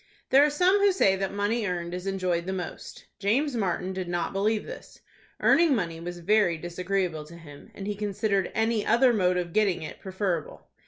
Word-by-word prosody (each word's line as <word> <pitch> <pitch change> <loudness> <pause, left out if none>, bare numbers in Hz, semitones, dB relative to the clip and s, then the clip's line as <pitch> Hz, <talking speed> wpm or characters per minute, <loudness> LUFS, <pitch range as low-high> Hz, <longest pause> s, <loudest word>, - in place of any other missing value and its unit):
There 270 +2 +7
are 300 - +4
some 360 +7 +3
who 400 0 +4
say 195 - +3
that 195 0 -2
money 205 +2 -1
earned 175 -1 -3
is 180 +1 -5
enjoyed 185 -3 -1
the 190 - -2
most. 180 -3 -7
James 250 +8 +1
Martin 190 -3 -1
did 185 -1 -4
not 175 +1 -2
believe 210 +2 0
this. - - -11 0.4
Earning 325 -4 +4
money 170 -6 -3
was 175 +1 -6
very 195 -2 +3
disagreeable 175 -1 -2
to 170 +3 -12
him, 145 -4 -13
and 195 - -7
he 210 - -2
considered 200 -1 -1
any 220 -1 +1
other 240 +2 +4
mode 180 -4 +2
of 175 -2 -3
getting 200 -6 +1
it 155 - -8
preferable. 190 -4 -3
195 Hz, 195 wpm, -27 LUFS, 175-220 Hz, 0.4 s, There